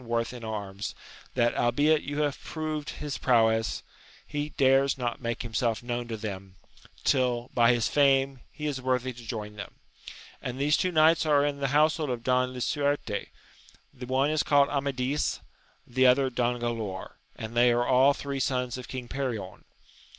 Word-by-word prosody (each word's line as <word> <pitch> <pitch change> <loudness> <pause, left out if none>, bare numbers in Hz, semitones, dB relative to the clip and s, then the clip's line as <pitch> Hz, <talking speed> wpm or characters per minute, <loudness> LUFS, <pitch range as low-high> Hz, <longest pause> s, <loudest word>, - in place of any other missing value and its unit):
worth 115 0 -1
in 120 -2 -9
arms, 105 -2 -5 0.4
that, 120 -2 +2
albeit 145 +6 +3
you 145 +1 -3
have 145 -2 -2
proved 155 -2 -4
his 150 -2 -5
prowess, 115 -3 +2 0.4
he 145 +1 -3
dares 135 0 +4
not 120 -1 -3
make 115 -1 -3
himself 115 0 -1
known 120 0 -3
to 115 -1 -4
them, 100 -3 -7 0.5
till, 125 -3 +1
by 120 0 +5
his 120 -2 +1
fame, 135 -2 +3
he 150 +1 -7
is 140 -3 -2
worthy 130 0 0
to 120 0 -12
join 105 -2 -6
them; - - -8 0.7
and 125 0 -5
these 145 +2 +3
two 185 - 0
knights 160 0 +5
are 145 -2 +3
in 145 -1 -2
the 140 - 0
household 150 +2 +2
of 120 -2 -3
King 125 0 +2
Lisnarte, 140 -3 -1 0.7
the 125 0 -9
one 135 +3 +2
is 155 -1 +2
called 145 -1 +4
Amadis, 140 0 -1 0.5
the 130 +1 +3
other 130 +1 +4
Don 120 0 0
Gralaor, 115 -5 -4 0.2
and 110 0 -7
they 120 +1 +5
are 120 0 +2
all 130 +3 +5
three 140 -1 -4
sons 125 -1 -1
of 125 - -9
King 130 -2 -6
Perion. 120 -9 -4
125 Hz, 170 wpm, -28 LUFS, 120-140 Hz, 0.7 s, by